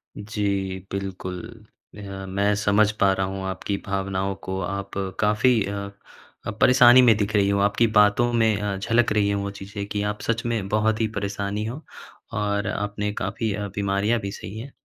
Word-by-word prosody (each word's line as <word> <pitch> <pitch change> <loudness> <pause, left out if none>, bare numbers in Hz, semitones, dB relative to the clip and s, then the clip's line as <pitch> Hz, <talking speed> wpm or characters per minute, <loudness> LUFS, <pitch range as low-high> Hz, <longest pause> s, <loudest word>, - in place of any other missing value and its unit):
जी, 100 -3 -2
बिल्कुल। 95 -2 -4 0.6
अ, 100 -1 -7
मैं 100 +2 +1
समझ 105 +1 +3
पा 100 -1 +5
रहा 95 0 -1
हूँ 95 0 -5
आपकी 95 +1 -3
भावनाओं 95 0 -2
को। 95 0 -2
आप 100 +2 -4 0.3
काफ़ी 110 +3 +3
अ 100 0 -4 0.6
अ, - - -1
परेशानी 125 +3 +7
में 120 -3 +6
दिख 105 0 -1
रही 100 -1 +3
हो। 100 0 +2
आपकी 100 +4 +3
बातों 105 +4 +4
में 110 -3 +2
अ, 105 -1 -1
झलक 115 +4 +1
रही 105 -1 +2
है 100 - +1
वो 100 0 -3
चीज़ें 100 +1 -7
कि 105 0 -2
आप 105 - -9
सच 115 0 -1
में 115 -5 -1
बहुत 110 +1 +1
ही 110 - +2
परेशानी 100 +1 -2
हो 125 +7 -5 0.5
और 100 0 -1
आपने 105 0 -2
काफ़ी 105 +2 -2
अ, 105 0 -3
बीमारियाँ 100 +3 +1
भी 100 -1 -5
सही 100 +1 -8
हैं। 135 +5 -8
100 Hz, 180 wpm, -24 LUFS, 100-110 Hz, 0.6 s, परेशानी